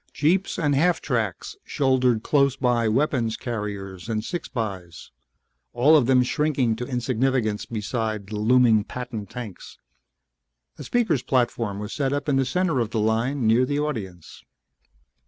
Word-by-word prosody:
Jeeps 175 +6 +1
and 145 -4 +1
half 165 +5 +2
tracks 110 -8 -2
shouldered 130 -4 +1
close 140 -3 +2
by 120 -3 +1
weapons 120 -1 0
carriers 105 -4 -5
and 110 -1 -2
six 175 - -5
bys, 95 - -6 0.6
all 140 +6 +5
of 135 -6 +4
them 130 -1 +5
shrinking 135 -4 0
to 125 +1 -5
insignificance 125 -3 -1
beside 110 -1 -3
the 105 - -7
looming 115 0 +4
Patton 115 -3 -6
tanks. 115 -3 -9 1.0
A - - -6
speakers' 215 - +1
platform 120 -5 0
was 105 +1 -6
set 140 -2 -1
up 145 +1 -3
in 140 -2 +2
the 135 - +2
center 170 0 0
of 115 -3 -1
the 115 -1 -2
line, 115 +5 0
near 115 +3 +4
the 145 +3 -1
audience. 105 - -5
125 Hz, 150 wpm, -24 LUFS, 110-140 Hz, 1.0 s, all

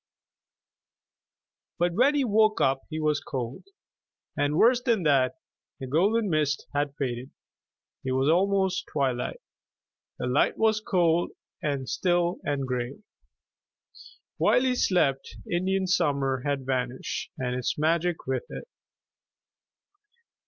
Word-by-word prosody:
But 175 0 +1
when 260 - +3
he 285 - +2
woke 215 -1 +3 0.3
he 155 -1 -4
was 150 -2 +1
cold. 125 -3 -5 0.7
And 145 +1 0
worse 240 +4 +5
than 230 -7 +1
that, 140 -2 +3 0.4
the 135 - -5
golden 200 - +2
mist 150 -4 0
had 145 -1 -1
faded. 125 -2 -3 0.7
It 130 - -1
was 130 +1 +1
almost 190 +2 +2
twilight. 130 -4 -1 0.8
The - - -3
light 125 +4 +2
was 220 -1 +2
cold 175 -4 +1 0.3
and 140 -3 -2
still 175 -1 +1
and 140 -2 -2
gray. 125 - -4 1.3
While - - +4
he 260 -1 +2
slept 145 - +1
Indian 190 +2 0
Summer 140 -7 +1
had 140 -2 -2
vanished 130 -1 -3
and 125 -1 -2
its 125 -1 -2
magic 165 +2 0
with 130 -1 -2
it. - - -8
155 Hz, 115 wpm, -27 LUFS, 135-185 Hz, 1.3 s, worse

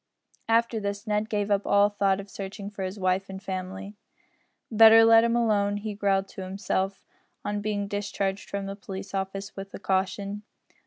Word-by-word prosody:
After 230 0 +2
this 200 +1 -4
Ned 210 0 0
gave 205 -1 -1
up 200 0 +1
all 200 0 +5
thought 195 -1 +1
of 200 - -7
searching 200 +1 -7
for 205 - -8
his 190 +2 -4
wife 185 +1 0
and 190 0 -6
family. 190 +1 -5 0.8
"Better 225 0 +8
let 225 0 +7
'em 235 0 +2
alone," 205 -3 +2
he 210 +1 -4
growled 195 -1 +1
to - - -8
himself 190 0 -2 0.4
on 205 0 -2
being 205 -1 -2
discharged 200 -1 -3
from 200 -1 -3
the 195 0 -5
police 195 -1 -8
office 195 +1 -4
with 195 0 -7
a - - -8
caution. 195 +2 -1
200 Hz, 175 wpm, -27 LUFS, 195-210 Hz, 0.8 s, Better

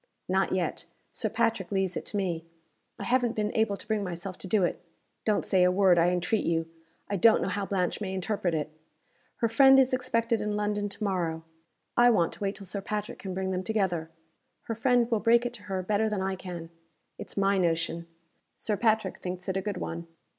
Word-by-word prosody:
"Not - - +1
yet. - - -1 0.3
Sir - - -2
Patrick 225 -5 0
leaves 190 -2 0
it - - -4
to 205 - -2
me. 175 -4 -1 0.5
I - - -6
haven't 245 -2 +1
been 210 0 -1
able 220 -3 +2
to - - -8
bring 215 -1 0
myself 180 0 -5
to - - -6
do 200 0 +3
it. 175 - -1 0.4
Don't 210 -2 +1
say 185 -2 +3
a 180 - +5
word, 185 -2 +5
I 170 +1 +4
entreat 180 +4 0
you. 165 -1 0 0.4
I 200 - -1
don't 220 +4 +6
know - - -1
how 195 +1 -2
Blanche 185 0 -1
may 190 -2 -2
interpret 190 -2 -1
it. 155 0 -2 0.7
Her 230 - +4
friend 270 +4 +7
is 260 -1 +4
expected 230 -2 +1
in 210 0 -1
London 205 0 -1
to 205 - -5
morrow. 170 -5 -1 0.5
I 240 0 +6
want 175 -8 +2
to - - -11
wait 200 0 -1
till 200 - -8
Sir 195 +2 -3
Patrick 210 +1 -4
can 190 -2 -5
bring 190 0 -1
them 185 0 -1
together. 185 -6 -1 0.5
Her 230 - -3
friend 245 +1 +3
will 225 - +3
break 235 +2 +4
it 245 - -2
to 215 -4 -10
her 190 -1 -1
better 215 +3 +1
than 205 -3 -1
I 190 0 -1
can. 175 -3 -7 0.5
It's - - -8
my 195 0 +3
notion. 170 -1 0 0.5
Sir 210 -2 -1
Patrick 220 -4 +1
thinks 180 0 -5
it 190 - -1
a - - 0
good 205 -1 -3
one. 170 -1 -5
200 Hz, 215 wpm, -28 LUFS, 180-220 Hz, 0.7 s, friend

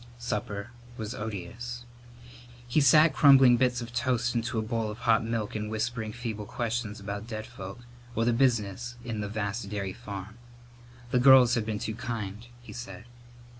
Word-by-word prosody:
Supper 105 -4 -4 0.3
was 110 +1 -4
odious. 110 +3 -6 0.8
He 135 +5 +3
sat 155 +4 +6
crumbling 135 -4 +7
bits 125 -1 +1
of 120 0 -8
toast 125 -1 0
into 120 +1 -1
a 110 - +1
bowl 115 -1 -2
of 105 - -6
hot 115 -2 +3
milk 115 -2 -2
and 105 0 -3
whispering 110 0 -2
feeble 110 -3 -5
questions 115 -2 -3
about 100 +2 -5
dead 110 -2 -5
folk 110 -1 -9 0.3
or 115 - +1
the 120 - +3
business 120 -1 +1
of 115 -3 -3
the 105 - -4
vast 105 0 -3
dairy 100 -2 -3
farm. 105 -1 -8 0.7
The 125 - +3
girls 125 -1 +7
had 115 -3 0
been 110 -2 -1
too 110 - -3
kind, 110 -1 -5 0.2
he - - -10
said. 120 0 -8
115 Hz, 170 wpm, -28 LUFS, 105-120 Hz, 0.8 s, crumbling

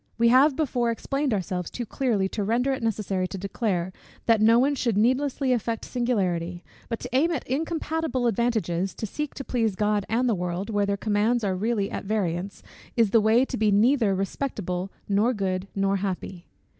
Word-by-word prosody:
We 235 0 +4
have 265 +4 +5
before 250 -6 0
explained 275 +4 -1
ourselves 180 -3 -2
too 240 - -5
clearly 225 -6 0
to 205 - -3
render 240 +6 +1
it 265 - -4
necessary 205 -4 -1
to 195 - -6
declare, 190 -2 -2 0.3
that 225 -2 +4
no 225 +2 +6
one 270 +4 +3
should 235 -6 0
needlessly 260 +3 +2
affect 230 -1 -2
singularity: 180 -8 -1 0.3
but 230 - -2
to - - -6
aim 305 +6 +4
at 330 -6 -3
incompatible 320 -1 -1
advantages, 195 -6 0
to - - -4
seek 300 +7 -4
to 275 - -5
please 225 -6 0
God 210 0 0
and 240 +3 +1
the 235 - +3
world, 180 +3 -3
where 205 -1 +1
their 200 0 0
commands 215 +3 +1
are 190 -2 0
really 205 0 -1
at - - -5
variance, 195 -2 -2 0.3
is 225 -4 +3
the 225 - +5
way 225 +4 +4
to 260 - -4
be 215 0 +2
neither 215 0 +3
respectable, 195 -3 -3 0.2
nor 210 +5 +2
good, 190 -1 -2
nor 195 0 +1
happy. 185 -2 -4
220 Hz, 185 wpm, -25 LUFS, 195-245 Hz, 0.3 s, no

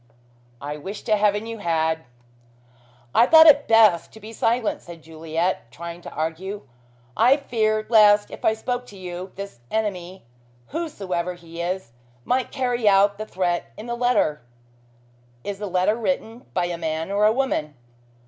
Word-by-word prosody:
"I 145 +1 -5
wish 195 +8 -7
to 215 - +2
heaven 210 +1 +1
you 230 -1 -6
had!" 160 -4 0 1.1
"I 235 - +5
thought 320 +1 +8
it 290 -2 +6
best 215 -7 +4
to 220 - -12
be 220 +2 -10
silent," 225 0 0
said 170 -2 -12
Juliet, 160 -2 -3
trying 170 +4 -8
to - - -9
argue. 165 +6 -4 0.5
"I 250 +5 +5
feared 215 -5 -1
lest 210 -2 +5
if - - -10
I 220 - +3
spoke 245 +2 -4
to 200 - -13
you, 180 0 -7
this 200 -9 -8
enemy, 190 -4 -3 0.5
whosoever 190 - -3
he 170 -1 -9
is, 180 -7 -3 0.3
might 255 +1 0
carry 245 -5 +1
out 200 +1 +3
the 215 - -5
threat 180 -3 -2
in 215 - -8
the 240 - -4
letter." 240 -11 +1 1.0
"Is 200 -1 -5
the 205 - -4
letter 185 +3 +1
written 235 0 -3
by 180 - +1
a 175 -1 -4
man 160 +2 -3
or 205 +1 +2
a - - +4
woman?" 220 - -1
200 Hz, 160 wpm, -23 LUFS, 170-225 Hz, 1.1 s, thought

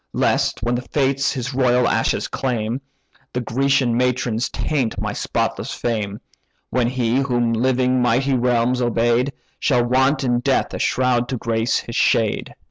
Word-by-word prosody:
Lest - - 0
when 120 - 0
the 120 - -1
Fates 135 +1 0
his 125 0 -4
royal 125 -1 +3
ashes - - 0
claim, 120 -1 -2 0.5
The 125 - -1
Grecian 130 +1 +1
matrons 125 -1 0
taint 135 -7 -2
my - - -3
spotless - - -2
fame; 105 -4 -3 0.5
When 125 -2 +1
he, 120 -1 0
whom 120 -4 +1
living 125 +1 +1
mighty 125 +3 +2
realms 125 0 +1
obey'd, 120 +2 +1 0.3
Shall 125 -4 +2
want 130 +4 +2
in 120 -2 +1
death 135 +1 0
a - - -4
shroud 125 -2 +1
to 130 - -2
grace 115 0 0
his 115 - -8
shade. 110 -2 +1
125 Hz, 150 wpm, -21 LUFS, 120-130 Hz, 0.5 s, royal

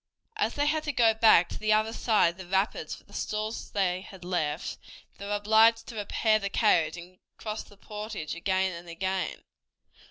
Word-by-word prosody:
As 425 - -1
they 290 - +1
had 310 +1 +1
to 295 - 0
go 230 -4 +4
back 220 -6 +5
to - - -7
the 215 0 +2
other 215 +1 +1
side 220 -7 +3
of 170 - -21
the 190 -2 -9
rapids 195 +3 -1
for - - -17
the - - -20
stores 215 +1 -3
they 185 -2 0
had 190 -2 -12
left, 160 -3 -2 0.4
they 200 - -6
were 205 - 0
obliged 220 +2 +4
to 235 - -8
repair 215 +1 +1
the 200 -1 -3
carriage 175 -7 +2
and 180 +2 -12 0.2
cross 215 0 -4
the 205 - -16
portage 210 -5 -6
again 190 +2 0
and 170 0 -9
again. 190 +2 -3
205 Hz, 195 wpm, -28 LUFS, 180-220 Hz, 0.4 s, back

